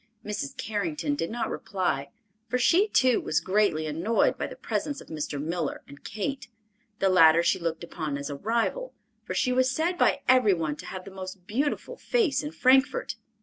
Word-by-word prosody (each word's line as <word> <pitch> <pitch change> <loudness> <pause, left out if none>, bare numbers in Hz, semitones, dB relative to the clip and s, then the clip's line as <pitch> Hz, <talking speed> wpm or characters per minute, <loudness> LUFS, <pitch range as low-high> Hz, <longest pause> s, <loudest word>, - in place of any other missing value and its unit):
Mrs. 260 +7 -4
Carrington 175 - -2
did 165 +3 -2
not 235 +1 -3
reply, 180 -8 -2 0.4
for 250 - 0
she, 350 - +4
too, 255 - +3
was 155 - +1
greatly 190 -5 +1
annoyed 165 +9 +1
by - - -3
the - - -9
presence 285 -1 -3
of - - -14
Mr. 150 -2 -4
Miller 160 +1 -3
and 140 0 -14
Kate. 265 +7 -4 0.5
The 195 - +2
latter 170 -3 +6
she - - +2
looked 165 -1 -3
upon 155 -4 -4
as 140 +1 -5
a - - -4
rival, 235 - -1 0.3
for - - -4
she 250 - +1
was 255 +1 +3
said 330 +7 -1
by - - +3
every 250 -7 +5
one 155 -3 -2
to - - -9
have 185 -1 -7
the 195 - -9
most 185 -1 -8
beautiful 285 - -2
face 445 - +1
in 295 - -5
Frankfort. 265 -2 +3
200 Hz, 190 wpm, -27 LUFS, 165-255 Hz, 0.5 s, latter